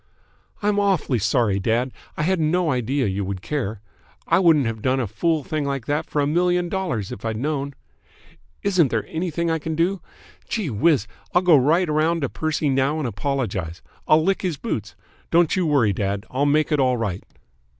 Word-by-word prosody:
"I'm 205 Hz, 0 st, +2 dB
awfully 190 Hz, -, +1 dB
sorry, 105 Hz, -1 st, +1 dB
dad. 120 Hz, +5 st, 0 dB, 0.3 s
I -, -, 0 dB
had 185 Hz, +2 st, +1 dB
no 160 Hz, +1 st, +1 dB
idea 130 Hz, +2 st, 0 dB
you 100 Hz, 0 st, -1 dB
would 95 Hz, -1 st, -5 dB
care. 115 Hz, -8 st, -3 dB, 0.4 s
I -, -, +3 dB
wouldn't 160 Hz, -7 st, +4 dB
have 115 Hz, -1 st, -3 dB
done 130 Hz, +2 st, +1 dB
a 125 Hz, -, 0 dB
fool 150 Hz, -, 0 dB
thing 155 Hz, +2 st, -2 dB
like 140 Hz, -4 st, -3 dB
that 145 Hz, +2 st, -1 dB
for 150 Hz, -, 0 dB
a -, -, +2 dB
million 175 Hz, +3 st, +1 dB
dollars 170 Hz, -, -2 dB
if 100 Hz, -, -8 dB
I'd 110 Hz, -1 st, -2 dB
known. 140 Hz, +1 st, -2 dB, 0.9 s
Isn't 185 Hz, -6 st, +3 dB
there 115 Hz, -2 st, -1 dB
anything 170 Hz, 0 st, -2 dB
I 160 Hz, -, 0 dB
can 160 Hz, +1 st, -4 dB
do? 180 Hz, +4 st, 0 dB, 0.5 s
Gee 200 Hz, -, -2 dB
whiz! 140 Hz, +1 st, +2 dB, 0.3 s
I'll 180 Hz, -, +4 dB
go 175 Hz, -3 st, +6 dB
right 155 Hz, +7 st, +3 dB
round 155 Hz, +2 st, +1 dB
to 135 Hz, -, 0 dB
Percy 155 Hz, -1 st, -1 dB
now 135 Hz, +2 st, +1 dB
and 150 Hz, -5 st, -2 dB
apologise. 100 Hz, -, -3 dB, 0.2 s
I'll 155 Hz, +1 st, +5 dB
lick 195 Hz, +2 st, +1 dB
his 175 Hz, -6 st, -2 dB
boots. 115 Hz, -, -4 dB, 0.3 s
Don't 170 Hz, 0 st, +3 dB
you 185 Hz, -3 st, +1 dB
worry, 130 Hz, -9 st, +3 dB
dad. 100 Hz, +1 st, -2 dB
I'll 140 Hz, +3 st, +1 dB
make 155 Hz, +2 st, +2 dB
it 150 Hz, -, +2 dB
all 130 Hz, -2 st, +2 dB
right." 100 Hz, -5 st, -3 dB
145 Hz, 190 wpm, -22 LUFS, 115-165 Hz, 0.9 s, go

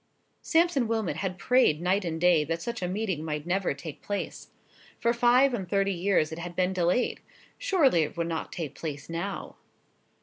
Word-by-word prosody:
Sampson 325 Hz, -7 st, +2 dB
Wilmot 220 Hz, -9 st, -1 dB
had 185 Hz, 0 st, -3 dB
prayed 250 Hz, -7 st, +3 dB
night 185 Hz, +4 st, +1 dB
and 165 Hz, -2 st, -3 dB
day 175 Hz, -3 st, +4 dB
that 165 Hz, +2 st, -3 dB
such 235 Hz, -2 st, -4 dB
a 180 Hz, -, -1 dB
meeting 185 Hz, -4 st, -2 dB
might 150 Hz, -1 st, -3 dB
never 180 Hz, -3 st, 0 dB
take 150 Hz, +1 st, -9 dB
place. 205 Hz, 0 st, -4 dB, 0.5 s
For 235 Hz, 0 st, +2 dB
five 245 Hz, +3 st, +4 dB
and 190 Hz, -6 st, -3 dB
thirty 195 Hz, 0 st, +1 dB
years 175 Hz, -3 st, +1 dB
it 160 Hz, -, -6 dB
had 175 Hz, 0 st, -6 dB
been 185 Hz, +1 st, +1 dB
delayed. 180 Hz, +6 st, +1 dB, 0.4 s
Surely 340 Hz, -, +3 dB
it 155 Hz, +2 st, -3 dB
would 170 Hz, -, 0 dB
not 165 Hz, -1 st, -4 dB
take 155 Hz, -5 st, -5 dB
place 145 Hz, -1 st, -6 dB
now. 180 Hz, +4 st, -4 dB
180 Hz, 180 wpm, -28 LUFS, 165-225 Hz, 0.5 s, day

